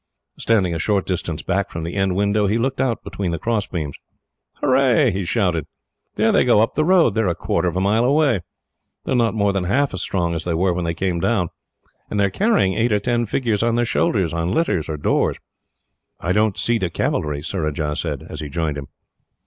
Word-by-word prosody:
Standing 100 -6 +2
a 80 - -3
short 100 +2 +1
distance 85 -4 -3
back 100 +2 -1
from 80 -3 -5
the 85 - -4
end 95 -2 0
window, 100 +1 +2
he 105 +3 +1
looked 130 +3 -1
out 125 -4 -1
between 95 -3 -4
the 85 - -2
crossbeams. 95 -10 -3 0.6
"Hurrah!" 130 0 +3
he 95 +1 -2
shouted. 90 -7 0 0.5
"There 110 +1 +3
they - - +4
go 120 -4 +4
up 115 +4 +2
the 155 - +1
road. 175 -6 +4
They 110 - 0
are 105 - 0
a 85 - 0
quarter 85 0 -1
of 85 - -2
a - - +1
mile 105 +4 +2
away. 135 - +3 0.6
They - - -4
are - - +2
not 115 -2 +2
more 100 -2 +2
than 95 -2 -1
half 135 +8 +1
as 95 - -3
strong 85 -3 -1
as 80 -1 -3
they 85 -2 -1
were 90 +2 +2
when 85 0 -2
they 85 0 -2
came 90 -2 -1
down. 90 -3 +1 0.6
They 105 -1 +1
are 100 - -1
carrying 200 - +2
eight 115 +3 +1
or 105 - +3
ten 120 +2 0
figures 115 -3 0
on 115 0 +1
their 120 0 +2
shoulders, 95 -7 +1
on 85 +1 -1
litters, 95 - 0
or 75 - -3
doors." 75 - +1 0.8
"I 85 - -2
don't 105 0 +2
see 120 -1 +1
the 90 - -1
cavalry," 75 -2 -2
Surajah 75 -4 -2
said, 75 -5 -4
as - - -7
he 75 -2 -5
joined 75 -2 -2
him. 70 - -8
100 Hz, 220 wpm, -21 LUFS, 85-115 Hz, 0.8 s, they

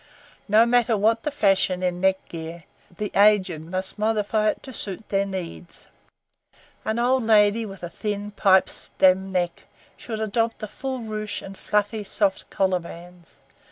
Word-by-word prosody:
No 220 +2 +5
matter 235 -2 +3
what 225 +3 +2
the 300 - -2
fashion 195 -8 +2
in 180 -1 -1
neck 190 0 +1
gear, 165 0 -8 0.3
the 210 -1 -3
aged 195 -6 +4
must 185 +5 -4
modify 215 0 +1
it - - -4
to 260 - -9
suit 205 -1 -4
their 200 0 +1
needs. 180 -2 -7 0.9
An 220 +1 -2
old 250 +1 +2
lady 220 0 +4
with 195 -2 -11
a - - -3
thin, 205 -1 -4
pipe 190 -2 +4
stem 190 +1 +2
neck 175 -2 -2 0.3
should 220 -2 -6
adopt 225 +1 -1
a - - -2
full 260 +4 -5
ruche 215 -1 -4
and 195 - -9
fluffy, 210 +2 -1
soft 200 -1 0
collar 190 -2 +1
bands. 175 0 -13
205 Hz, 160 wpm, -24 LUFS, 185-220 Hz, 0.9 s, No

